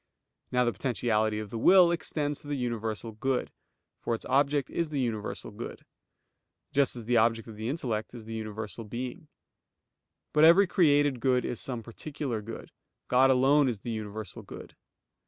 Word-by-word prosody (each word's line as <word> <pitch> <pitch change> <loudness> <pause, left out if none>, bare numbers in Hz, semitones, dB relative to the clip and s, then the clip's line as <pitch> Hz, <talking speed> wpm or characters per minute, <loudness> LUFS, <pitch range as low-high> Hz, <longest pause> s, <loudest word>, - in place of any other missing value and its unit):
Now 125 0 +3
the 120 - +1
potentiality 110 -1 0
of 105 -1 -6
the 115 - -4
will 180 +5 +7
extends 150 -3 -1
to - - -13
the 145 -1 -2
universal 115 -2 -3
good; 125 +4 -2 0.5
for 115 - -1
its - - -10
object 140 +1 +1
is 170 -2 -1
the 145 -2 -2
universal 115 -5 -3
good; - - -8 0.9
just 140 -2 +2
as 120 -2 -7
the 120 +1 +2
object 115 0 +2
of 110 - -9
the 110 +2 -4
intellect 125 -6 -3
is 115 -2 -9
the 115 - -7
universal 110 0 -5
being. 125 - -6 1.1
But 150 - +4
every 170 +5 +8
created 145 -7 +3
good 125 +1 +2
is 120 - -3
some 120 -4 -4
particular 125 -1 -5
good; 115 +2 -9 0.4
God 130 +1 +5
alone 135 +2 +4
is 110 -5 -4
the 120 - -4
universal 110 -2 -6
good. - - -11
125 Hz, 170 wpm, -29 LUFS, 110-145 Hz, 1.1 s, every